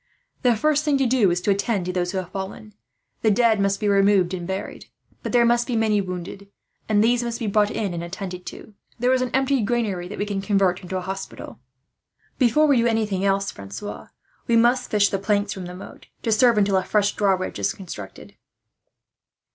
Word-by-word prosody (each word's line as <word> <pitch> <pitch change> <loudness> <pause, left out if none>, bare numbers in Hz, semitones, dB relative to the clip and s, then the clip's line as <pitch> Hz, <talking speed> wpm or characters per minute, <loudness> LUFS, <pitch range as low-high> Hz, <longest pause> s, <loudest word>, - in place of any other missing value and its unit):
"The 245 -2 +3
first 300 +5 +1
thing 295 -2 +2
to 270 - +1
do 240 -5 +3
is 175 0 0
to 200 - +1
attend 200 -1 0
to 180 - -3
those 180 -1 -1
who 195 - -3
have 185 -2 -4
fallen. 195 +2 -7 0.5
The 220 - +3
dead 220 0 +3
must 195 0 +1
be 210 - -1
removed 195 -2 +3
and 175 -2 -4
buried; 190 +1 -5 0.3
but - - -4
there 240 -1 +4
must 240 0 +2
be 245 - -1
many 215 -2 +2
wounded, 185 +2 -7 0.4
and 210 -1 +4
these 240 +1 +3
must 235 -1 -3
be 230 - -4
brought 210 0 +2
in 200 -4 -3
and 170 0 -4
attended 180 0 -7
to. 215 - -10 0.2
There 250 +2 +2
is 260 - +2
an 255 - -1
empty 265 0 +1
granary 205 -5 -1
that 205 - -8
we 205 - -1
will 200 -1 -3
convert 195 -3 +1
into 185 +1 -4
a - - -3
hospital." 190 +1 -7 0.8
"Before 265 +4 +4
we 285 -4 +4
do 235 0 +3
anything 215 -4 0
else, 195 0 +1
Francois, 100 - -8 0.4
we 235 - +3
must 240 +2 +3
fish 205 -1 +3
the 195 - -2
planks 205 0 0
from 185 -2 -7
the 180 - -8
moat, 185 - -12 0.2
to 225 - 0
serve 235 0 +4
until 200 -2 +3
a 185 - +1
fresh 205 +1 +1
drawbridge 190 -2 0
is 195 - +1
constructed. 165 - -10
205 Hz, 210 wpm, -23 LUFS, 190-235 Hz, 0.8 s, there